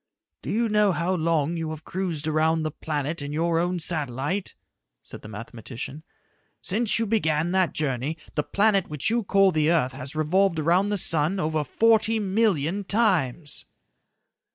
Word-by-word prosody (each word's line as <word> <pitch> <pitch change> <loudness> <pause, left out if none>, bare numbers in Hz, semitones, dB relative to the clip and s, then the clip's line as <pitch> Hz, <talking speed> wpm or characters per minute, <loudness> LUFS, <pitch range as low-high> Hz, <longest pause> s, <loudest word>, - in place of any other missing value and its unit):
"Do - - -7
you 230 +2 +1
know 210 -2 +3
how 170 +3 -1
long 165 -2 0
you 165 -1 -3
have 155 0 -7
cruised 170 -5 -3
around 160 +1 +1
the 155 - -2
planet 150 +1 -4
in 145 0 -5
your 165 +2 0
own 175 +1 0
satellite?" 155 +2 +1 0.5
said - - -9
the - - -11
mathematician. 115 +6 -8 0.6
"Since 215 +3 0
you 230 - 0
began 170 -7 0
that 185 -2 +1
journey, 145 +1 -2 0.2
the 150 - 0
planet 200 +3 +1
which 150 +7 -2
you 235 0 +1
call 195 -1 +3
the 155 -2 +1
earth 155 -7 +2
has 135 +2 -5
revolved 170 +4 +2
around 175 +6 +2
the 205 - 0
sun 165 +1 +2
over 155 -2 0
forty 225 +5 +2
million 200 -4 0
times." 175 - 0
165 Hz, 160 wpm, -25 LUFS, 150-195 Hz, 0.6 s, know